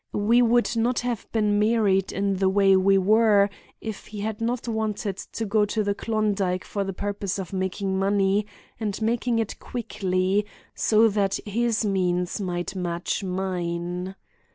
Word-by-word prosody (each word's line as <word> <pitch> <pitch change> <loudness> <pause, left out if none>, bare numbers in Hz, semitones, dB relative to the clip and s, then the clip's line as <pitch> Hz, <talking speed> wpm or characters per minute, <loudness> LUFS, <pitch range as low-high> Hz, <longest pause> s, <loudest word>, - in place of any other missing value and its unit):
We 225 +4 +3
would 240 0 +3
not 235 +2 +1
have 240 -4 -4
been 210 -2 +2
married 210 -3 +2
in 195 0 -1
the 190 0 +2
way 195 0 +4
we 195 +1 +4
were 205 0 +4 0.3
if 220 -3 -6
he 210 -1 -7
had 215 +1 -3
not 240 +1 -2
wanted 215 -3 -2
to 225 - -5
go 210 +1 +2
to 215 +1 -1
the 200 0 0
Klondike 205 -4 -1
for 200 - -2
the 195 - -3
purpose 200 0 -3
of 190 -2 -6
making 190 +1 -1
money 200 +1 +2 0.3
and 210 -3 -2
making 230 +1 0
it 225 -2 -2
quickly, 195 -4 -1 0.3
so 220 +1 +4
that 200 -1 +1
his 225 +1 0
means 180 -1 0
might 180 0 -3
match 175 +1 -2
mine. 180 -1 -3
200 Hz, 155 wpm, -25 LUFS, 190-220 Hz, 0.3 s, way